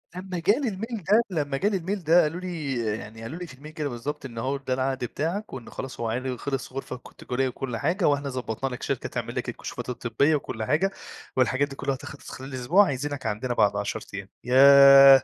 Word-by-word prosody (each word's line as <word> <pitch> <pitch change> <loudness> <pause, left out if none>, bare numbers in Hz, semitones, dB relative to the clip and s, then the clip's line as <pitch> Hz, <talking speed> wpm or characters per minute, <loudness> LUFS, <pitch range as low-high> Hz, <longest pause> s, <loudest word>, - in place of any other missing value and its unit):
لمّا 185 -1 -4
جالي 225 - +2
الmail 220 +1 -5 0.3
ده 160 -4 +1
لمّا 140 -1 -2
جالي 200 +4 +1
الmail 185 +2 -3
ده 165 +3 +6
قالوا 160 +4 -1
لي، 160 -7 -3 0.2
يعني 110 0 -10
قالوا 130 +9 -6
لي 180 - -6
في 130 - -11
الmail 150 +3 -10
كده 150 -2 -2
بالضبط، 140 +5 -5
إن 120 -4 -8
هو 135 +4 -1
ده 135 -2 -3
العقد 130 +1 0
بتاعك، 170 - -3
وإن 125 -3 -7
خلاص 130 -2 -7
هو 115 -1 -1
عقدي 125 +2 -2
خِلص 135 -1 -4
غرفة 135 -1 -5
ك - - -15
تجارية 130 +1 -2
وكلّ 125 -2 -4
حاجة، 170 - 0
وإحنا 145 -1 +1
ضبّطنا 125 0 -3
لك 125 - -7
شركة - - -2
تعمل - - -4
لك - - -2
الكشوفات - - -6
الطبية 125 +5 +1
وكلّ 110 -6 -4
حاجة، 160 - +2 0.4
والحاجات 130 +2 +2
دي 135 - -8
كُلّها 135 0 -1
هتخلص 140 +2 -10
في - - -7
خلال 130 +1 -8
أسبوع، 160 +11 +4
عايزينك 140 -2 -3
عندنا 115 +3 -1
بعد 105 -3 +3
10 105 +2 -2
أيام، 95 0 -6
ياه! 135 +1 +9
135 Hz, 215 wpm, -26 LUFS, 125-160 Hz, 0.4 s, ياه